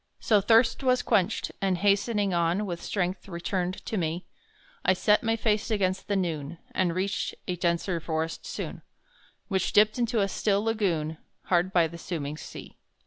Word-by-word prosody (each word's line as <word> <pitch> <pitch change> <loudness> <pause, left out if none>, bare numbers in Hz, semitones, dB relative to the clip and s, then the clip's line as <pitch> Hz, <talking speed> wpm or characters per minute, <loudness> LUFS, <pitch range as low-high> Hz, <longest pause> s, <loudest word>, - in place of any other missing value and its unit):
So 210 -3 +3
thirst 225 +5 +4
was 255 -2 +2
quenched, 200 +2 +1
and 190 -2 +1
hastening 205 +1 +2
on 170 +4 +1
With 175 -3 -4
strength 190 0 -2
returned 180 +1 -3
to 220 - -2
me, 170 0 -2 0.6
I 185 - +4
set 210 +3 +3
my 225 -1 +1
face 215 -1 0
against 190 -3 0
the 205 - 0
noon, 165 -4 -2
And 175 -3 0
reached 195 +2 -1
a 180 - -1
denser 170 0 0
forest 160 0 -3
soon; - - -5 0.7
Which 190 -3 0
dipped 215 +3 +5
into 235 -1 +1
a 195 - +2
still 200 +1 +1
lagoon 170 -9 0 0.2
Hard 180 +1 +2
by 175 -3 +4
the 170 +1 -10
sooming 155 -4 -4
sea. - - -10
190 Hz, 165 wpm, -27 LUFS, 170-210 Hz, 0.7 s, dipped